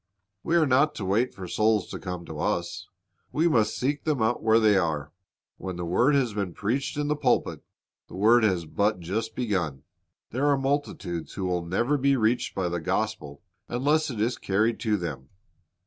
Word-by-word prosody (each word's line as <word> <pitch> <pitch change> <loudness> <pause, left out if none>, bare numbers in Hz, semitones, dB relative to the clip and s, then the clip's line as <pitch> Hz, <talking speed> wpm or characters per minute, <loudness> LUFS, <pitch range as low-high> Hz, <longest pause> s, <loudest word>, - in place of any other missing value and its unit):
We 170 - 0
are 165 -2 +5
not 140 +3 +3
to 105 - -4
wait 110 +7 +1
for 95 -2 -8
souls 105 +2 +2
to - - -5
come 90 -2 -6
to - - -8
us; 85 0 -2 0.4
we 160 +3 +2
must 110 -9 +2
seek 140 +3 -1
them 150 -4 0
out 110 +2 +1
where 110 +1 +4
they 110 -2 +4
are. 80 -5 0 0.5
When 95 -1 -5
the 90 0 -4
word 120 +12 +3
has 125 -6 +1
been 100 -5 -3
preached 125 +8 -2
in 150 0 -1
the 150 - +1
j^ulpit, 135 -4 0 0.5
the - - -11
work 110 +5 +5
has 95 -6 +1
but 100 +5 0
just 105 +6 -3
begun. 90 - -2 0.5
There 130 +5 0
are 140 -1 +4
multitudes 135 - -2
who 95 - -3
will 90 -1 -1
never 120 +12 0
be 140 +1 +3
reached 120 +2 0
by 95 -2 0
the 85 0 -2
gospel 95 -5 -3 0.3
unless 150 +5 +1
it 120 -5 -5
is 115 +4 0
carried 110 +4 +1
to 110 -3 +1
them. 75 -7 -6
110 Hz, 195 wpm, -26 LUFS, 90-130 Hz, 0.5 s, are